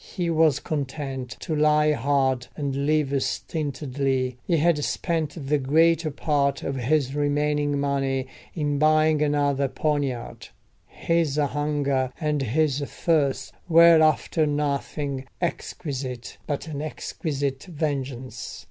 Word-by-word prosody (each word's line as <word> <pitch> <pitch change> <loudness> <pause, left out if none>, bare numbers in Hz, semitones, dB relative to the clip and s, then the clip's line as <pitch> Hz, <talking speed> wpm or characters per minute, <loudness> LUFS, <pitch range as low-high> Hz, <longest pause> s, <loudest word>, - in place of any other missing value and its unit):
He 175 -3 0
was 155 -3 +3
content 135 -4 -4
to 160 - -2
lie 150 0 +4
hard, 135 -3 +1
and 140 -1 -2
live 155 -2 +2
stintedly—he 135 -1 -2
had 155 -1 +2
spent 160 -4 -2
the 150 +1 +2
greater 160 +4 +3
part 140 -2 0
of 140 - -2
his 135 +1 +1
remaining 145 0 0
money 135 -2 0 0.3
in 145 -3 -1
buying 155 0 +4
another 145 -2 +1
poniard: 140 -4 -2 0.4
his 165 -4 0
hunger 145 -3 0
and 150 -3 0
his 140 +3 +1
thirst 140 -2 0 0.2
were 165 0 +7
after 155 0 +2
nothing 140 -2 -2
exquisite 135 -7 -4
but 145 +2 -3
an 145 -2 -4
exquisite 140 -3 -3
vengeance. 140 -6 -4
145 Hz, 110 wpm, -25 LUFS, 135-155 Hz, 0.4 s, were